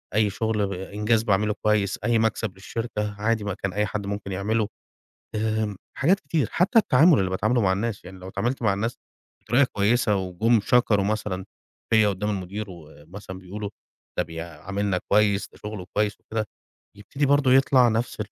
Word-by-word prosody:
أي 110 -1 +3
شُغل 105 -1 -1
إنجاز 105 +4 0
باعمله 105 -1 +2
كويس، 105 -2 +2
أي 120 -1 +2
مكسب 110 -2 0
للشركة، 105 +1 -4
عادي 110 -1 +1
ما 100 -2 -2
كان 95 -1 -4
أي 105 +2 +1
حد 100 0 -4
ممكن 100 -1 -4
يعمله. 105 +3 0 0.7
آآ 110 -1 -1 0.2
حاجات 180 +8 +3
كتير، 145 -4 -1
حتّى 200 +7 +3
التعامل 160 - +5
اللي 95 -1 +1
باتعامله 110 +6 +1
مع 95 -3 +3
الناس، 105 +2 -2
يعني 95 +1 -10
لو 90 +1 -9
اتعاملت 120 +7 -2
مع 110 - +3
الناس 115 +4 -2 0.5
بطريقة 125 +5 +3
كويسة 105 +1 +2
وجُم 100 +5 +2
شكروا 110 -5 +3
مثلًا 100 -3 -2 0.5
فيّا 110 -2 +5
قُدّام 100 +1 -1
المدير 100 +2 -4
ومثلًا 85 +3 -11
بيقولوا 100 +3 -6 0.5
ده - - +4
بيعاملنا 85 +4 -3
كويس، 100 -1 +3
ده - - -17
شُغله 105 -3 -7
كويس 105 -1 0
وكده 110 -1 -3 0.5
يبتدي 135 +8 -2
برضه 140 -2 +4
يطلع 130 -2 +5
نفس 115 +1 -1
105 Hz, 165 wpm, -25 LUFS, 95-115 Hz, 0.7 s, التعامل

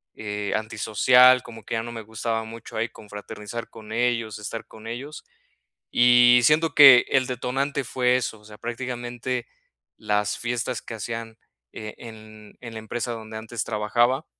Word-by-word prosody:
eh, 105 -1 -4
antisocial, 115 +4 +4
como 115 -2 -11
que - - -3
ya 115 - -1
no 120 - -7
me 115 - -6
gustaba 110 +1 -3
mucho 115 +1 -10
ahí, 115 +1 -1
confraternizar 105 +2 -8
con 110 -1 -11
ellos, 115 -2 0
estar 110 +2 -6
con 110 0 -14
ellos. 135 +6 -7 0.7
Y 120 0 +6
siento 155 +3 +3
que 135 -4 +9
el 130 -2 +2
detonante 135 +3 -2
fue 125 0 +2
eso, 110 -4 -3
o - - -22
sea, 105 0 -13
prácticamente 120 0 -4 0.5
las 105 0 -1
fiestas 120 0 -3
que - - -8
hacían, 115 0 -6 0.3
eh, 105 -1 -8
en 110 -2 -13
en 115 -2 -9
la 110 - -6
empresa 120 +2 -4
donde 110 -1 -7
antes 110 +1 -5
trabajaba, 120 +6 +1
115 Hz, 160 wpm, -24 LUFS, 110-125 Hz, 0.7 s, que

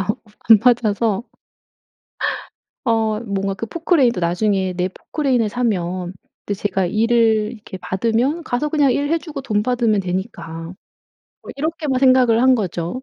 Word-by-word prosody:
아 195 - -2 0.4
안 220 -2 +9
맞아서. 230 -3 +2 1.6
어 220 -2 +1
뭔가 195 -3 -2
그 195 - -5
포클레인 310 -2 +2
도 180 - -4
'나중에 185 +2 0
내 180 +1 -1
포클레인 265 - -1
을 220 - +1
사면' 185 -6 -2 0.4
제가 195 -1 -1
일을 220 +2 +2
이렇게 210 -4 -10
받으면 230 - 0
'...가서 270 +4 -1
그냥 290 -4 +3
일해주고 300 +1 -2
돈 210 -6 0
받으면 235 -4 +1
되니까.' 180 -3 -5 0.8
뭐 - - -9
이렇게만 305 -3 -2
생각을 255 -3 +4
한 260 -1 +5
거죠. 180 +3 -3
225 Hz, 280 characters per minute, -20 LUFS, 195-255 Hz, 1.6 s, 안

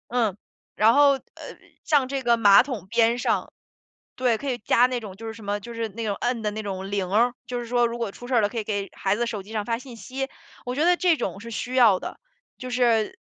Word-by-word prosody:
嗯， 230 -6 +1 0.4
然 220 +2 +5
后， 285 +1 +6
呃， 270 - -4 0.6
像 290 -4 +3
这 275 0 -2
个 235 -2 +3
马 205 -3 +7
桶 250 -8 -6
边 235 +1 +3
上 245 - -1 0.6
对， 250 -3 +2
可 275 +4 -4
以 245 - -2
加 240 +3 +4
那 255 -1 -2
种 210 -5 -8
就 225 +3 -9
是 - - -4
什 220 -1 -12
么， 205 +1 -2
就 235 +4 -9
是 230 -1 -2
那 225 +3 -6
种 205 -2 -1
摁 240 -2 -2
的 210 - 0
那 215 +1 -5
种 195 -2 -5
铃 195 -2 -1
儿。 235 +4 +3
就 245 -1 -3
是 240 - -7
说 240 0 +2
如 235 0 -4
果 230 -3 -2
出 245 - -11
事 255 - -2
了， 205 - +2
可 235 - -6
以 220 - -2
给 200 -2 -3
孩 195 0 +1
子 240 +3 -1
手 210 -4 -5
机 210 - -12
上 215 -2 -2
发 230 +1 -1
信 255 -1 -11
息， 265 +3 -5 0.4
我 250 - -2
觉 295 +4 +1
得 355 +1 +4
这 350 -2 +3
种 195 - -4
是 230 +2 -9
需 250 +3 -4
要 220 -7 +6
的。 - - -7 0.4
就 255 - -7
是， 245 - +1
230 Hz, 275 characters per minute, -24 LUFS, 210-250 Hz, 0.6 s, 马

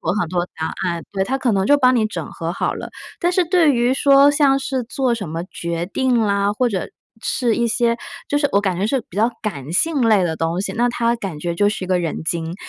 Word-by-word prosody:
做 - - -1
很 170 - -1
多 175 0 -1
答 160 - -2 0.2
案， 170 -1 -3
对， 190 -1 0
它 265 +7 -1
可 250 -3 +1
能 195 -1 +1
就 290 +8 +5
帮 255 -2 +4
你 225 - +2
整 170 -8 -5
合 165 +1 -4
好 - - -1
了。 - - -7 0.3
但 350 - +2
是 360 0 +2
对 330 -4 +4
于 240 +1 +2
说 275 0 +5
像 280 -2 +3
是 265 -1 -2
做 245 +1 -1
什 200 -7 -5
么 165 +2 -4
决 170 -1 -4
定 250 +4 +1
啦， 200 -1 +1
或 245 +4 +1
者 195 -5 -3 0.3
是 240 -4 0
一 235 +1 +1
些 235 0 +1 0.3
就 290 - +1
是 285 -1 +1
我 200 - +4
感 185 -3 -1
觉 200 - +1
是 270 +3 +1
比 - - -14
较 225 +3 +3
感 145 -9 -5
性 320 - +1
类 200 -4 +4
的 160 -2 -2
东 165 +2 -1
西， - - -3
那 240 +2 +1
它 235 -1 +1
感 195 -9 -6
觉 170 +2 -3
就 205 +4 +3
是 205 -3 -3
一 - - -6
个 185 -1 +2
人 165 -2 -3
精， 165 0 -2
215 Hz, 275 characters per minute, -20 LUFS, 175-255 Hz, 0.3 s, 就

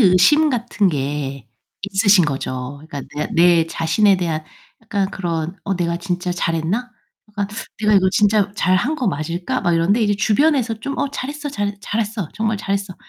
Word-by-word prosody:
의심 230 - +5
같은 235 -5 +1
게 140 -4 -3 0.3
있으신 200 -1 +4
거죠. 135 -1 -4
그러니까 145 -3 -6
그냥 150 - -3
내 170 -1 +5
자신에 175 +5 +2
대한 165 -4 -2 0.4
약간 200 -3 -1
그런 170 -1 -3
'어 195 - -1
내가 170 -1 -1
진짜 180 0 -3
잘 170 -1 -1
했나?' 200 +11 -2 0.4
약간 205 -1 -2 0.3
'내가 215 -1 +3
이거 190 -1 +5
진짜 205 -1 +3
잘 185 -2 +2
한 290 - 0
거 260 -6 -2
맞을까?' 175 - -2
막 175 -2 +2
이러는데 185 +7 +2
이제 205 -1 +2
주변에서 245 +4 +2
좀 275 +3 -4
"어 280 - 0
잘했어 290 +2 -5
잘 205 -7 -2
잘했어. 210 -3 -2
정말 220 0 0
잘했어." 195 -2 -2
195 Hz, 335 characters per minute, -20 LUFS, 170-215 Hz, 0.4 s, 의심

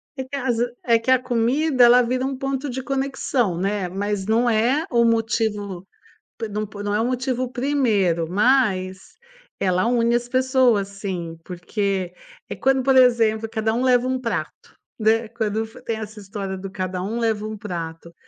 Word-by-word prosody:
Em 265 -2 -5
casa, 245 -3 -1
é 230 -2 +4
que 230 - -5
a 260 - +6
comida 255 +3 +2
ela 245 +1 +6
vira 255 +2 -1
um 270 0 -2
ponto 270 +1 -3
de 260 +1 -4
conexão, 270 -7 -1
né, 195 0 -1
mas 200 +1 -2
não 230 +3 +2
é 240 +7 +2
o 235 -2 +4
motivo, 220 -4 0 0.5
por 225 - -4
não 210 +1 -3
p 205 0 -8
não 205 0 -1
é 210 - +1
o 225 - +1
motivo 255 0 -1
1º, 225 - +1
mas 195 -3 +2 0.6
ela 185 0 +1
une 235 -1 +2
as 240 0 -1
pessoas 255 -5 +2
sim, 185 -5 -5
porque 185 0 -2 0.5
quando, 265 -1 +3
por 265 0 +4
exemplo, 225 -3 +4
cada 220 0 -1
um 240 +3 0
leva 250 -1 +4
um 260 0 -1
prato, 235 -2 -5 0.2
né, 220 +1 +2
quando 220 -1 -2 0.2
tem 230 - -2
essa 215 0 -8
história 195 -1 -5
do, 195 +1 -7
cada 185 -1 -4
um 215 +5 -3
leva 220 -2 0
um 215 0 -6
prato, 170 -4 -6
225 Hz, 170 wpm, -22 LUFS, 200-255 Hz, 0.6 s, a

